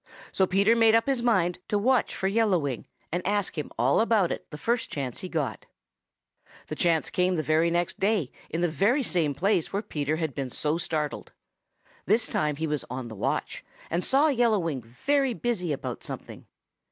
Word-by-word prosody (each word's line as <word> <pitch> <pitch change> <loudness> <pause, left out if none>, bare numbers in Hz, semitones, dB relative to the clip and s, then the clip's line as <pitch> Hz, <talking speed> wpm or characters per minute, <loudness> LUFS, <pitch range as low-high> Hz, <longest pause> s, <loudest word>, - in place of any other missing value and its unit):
So 190 - +2
Peter 200 +5 +4
made 225 -1 +5
up 230 - +3
his 270 -3 0
mind 185 -7 +2
to 205 - +1
watch 250 +3 +2
for 190 - -1
Yellow 210 -2 +3
Wing 140 -7 -3 0.2
and 175 +2 -1
ask 205 0 0
him 150 -3 -4
all 125 - +3
about 220 -6 +2
it - - -5
the 150 - -8
first 235 +9 -1
chance 135 -4 -4
he 185 - -6
got. 145 - -3 1.0
The - - -3
chance 165 -2 +1
came 180 0 +2
the 155 - -1
very 160 +2 +3
next 175 0 -1
day 195 - +1 0.2
in 165 - -2
the 175 - +3
very 205 - +2
same 165 - +1
place 190 0 +1
where 200 +2 -2
Peter 150 -6 -2
had 160 -3 -2
been 135 -1 -3
so 150 +6 -1
startled. 155 -4 -3 0.7
This 220 +4 +3
time 150 -6 0
he 160 +3 -2
was 150 -3 -2
on 125 -1 -5
the 110 - -8
watch - - -2 0.3
and 175 +2 0
saw 285 +4 +4
Yellow 235 -5 +3
Wing 165 -8 -2
very 260 - 0
busy 210 -10 -1
about 140 - -4
something. - - -8
175 Hz, 195 wpm, -27 LUFS, 150-220 Hz, 1.0 s, made